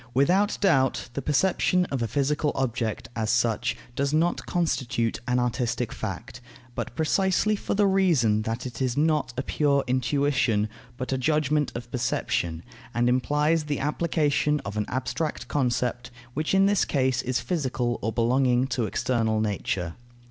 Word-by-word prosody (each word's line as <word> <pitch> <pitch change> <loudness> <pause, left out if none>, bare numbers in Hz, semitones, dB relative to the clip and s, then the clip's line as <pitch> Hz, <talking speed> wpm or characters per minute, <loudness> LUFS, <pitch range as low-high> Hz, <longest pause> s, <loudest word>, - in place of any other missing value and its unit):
Without 185 +10 +3
doubt, 135 - +2
the 140 - -3
perception 180 +5 +2
of 135 -3 -1
a 115 - 0
physical 145 +3 0
object, 120 -4 -2
as 110 -1 -1
such, 120 -2 +1 0.2
does 140 +2 0
not 165 +3 +1
constitute 130 -9 0
an 125 0 +2
artistic 120 -1 -1
fact; 110 +5 -6 0.3
but 120 0 -5
precisely 190 +6 +2
for 205 - -3
the 205 0 +3
reason 165 - +3
that 115 +3 -3
it 125 0 -6
is 130 -1 0
not 150 -3 +2
a 130 - -1
pure 140 -1 +1
intuition, 130 -3 +1 0.3
but 130 +1 -3
a 130 - 0
judgment 150 0 +1
of 120 0 -7
perception, 85 -9 -1 0.3
and 120 +1 +2
implies 150 +5 +2
the 145 -2 -2
application 150 0 +1
of 100 +1 -5
an 105 -1 -1
abstract 130 +5 -3
concept, 125 -2 -1 0.2
which 155 +6 0
in 195 0 +5
this 200 -1 +3
case 130 -2 +1
is 130 0 -1
physical 130 -8 -1
or 110 - -1
belonging 125 +2 +2
to 130 -3 -1
external 115 -1 0
nature. 95 -5 -2
130 Hz, 155 wpm, -26 LUFS, 120-150 Hz, 0.3 s, in